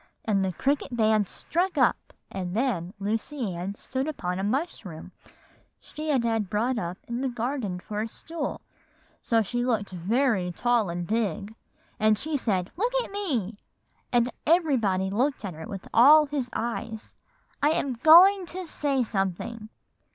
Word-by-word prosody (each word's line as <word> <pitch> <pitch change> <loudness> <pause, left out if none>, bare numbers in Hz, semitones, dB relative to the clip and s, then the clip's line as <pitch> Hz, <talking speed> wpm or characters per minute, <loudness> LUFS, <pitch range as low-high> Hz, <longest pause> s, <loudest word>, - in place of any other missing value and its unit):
"And 200 -3 +2
the 190 - 0
cricket 270 - -1
band 215 -3 +3
struck 355 0 -2
up; 255 -4 +2 0.2
and 185 -1 -4
then 215 -7 -1
Lucy 220 +2 -2
Ann 180 +4 -4
stood 260 +5 -3
upon 180 -12 -3
a - - -2
mushroom 205 - -3 0.7
she 310 +1 -7
had 265 -5 +2
had 225 -4 0
brought 230 +4 0
up 175 +1 -4
in 235 +1 -3
the 270 - 0
garden 235 -6 -3
for 210 +3 -4
a 220 - -2
stool, 315 +6 -5 0.6
so 225 -1 +2
she 240 +4 -2
looked 225 -6 0
very 190 +1 +1
tall 235 +1 +1
and 175 0 -3
big, 215 0 -2 0.5
and 215 0 +4
she 310 +6 -3
said, 195 -9 -1
'Look 470 +6 0
at - - -10
me,' 250 - -2 0.5
and 240 0 +2 0.2
everybody 235 - +2
looked 255 +3 0
at 190 - -4
her 160 +1 -8
with 195 -1 -7
all 295 +6 +8
his 280 -4 -3
eyes; 225 -1 -4 0.5
'I 295 - +4
am 275 -4 -1
going 350 +9 +7
to 370 +2 -6
say 280 -5 0
something. 215 +2 -3
230 Hz, 160 wpm, -26 LUFS, 195-275 Hz, 0.7 s, all